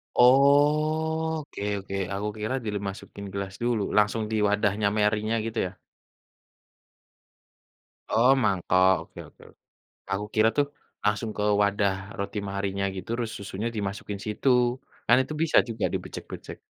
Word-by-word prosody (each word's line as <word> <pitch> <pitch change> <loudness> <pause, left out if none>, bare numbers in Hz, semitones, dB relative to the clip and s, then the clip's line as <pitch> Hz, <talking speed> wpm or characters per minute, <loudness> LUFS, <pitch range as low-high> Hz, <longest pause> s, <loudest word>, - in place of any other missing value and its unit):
Oke 150 +3 +3 0.2
oke, 95 0 -6 0.2
aku 100 +2 -2
kira 110 +5 -2
dimasukin 100 -1 -5
gelas 100 -1 -4
dulu, 120 -3 +1 0.2
langsung 105 +1 +3
di - - 0
wadahnya 105 0 +2
Marienya 105 +1 +1
gitu 115 0 -3
ya? 90 - -12 2.3
Oh, 120 +4 +5
mangkok, 95 -2 +3
oke - - -14
oke-oke. - - -19 0.5
Aku 100 +2 -2
kira 110 +1 +5
tuh 145 - +4 0.4
langsung 105 +1 0
ke - - -1 0.2
wadah 100 -1 +2 0.3
roti 100 +1 -3
Marienya 100 0 -2
gitu 95 +1 -7
terus 115 -2 -2
susunya 100 +3 -4
dimasukin 100 0 -4
situ. 105 +5 0 0.6
Kan 120 - +7
itu 145 - -7
bisa 165 - +3
juga 110 -2 -1
dibejek-bejek. - - -7
105 Hz, 125 wpm, -26 LUFS, 100-120 Hz, 2.3 s, Kan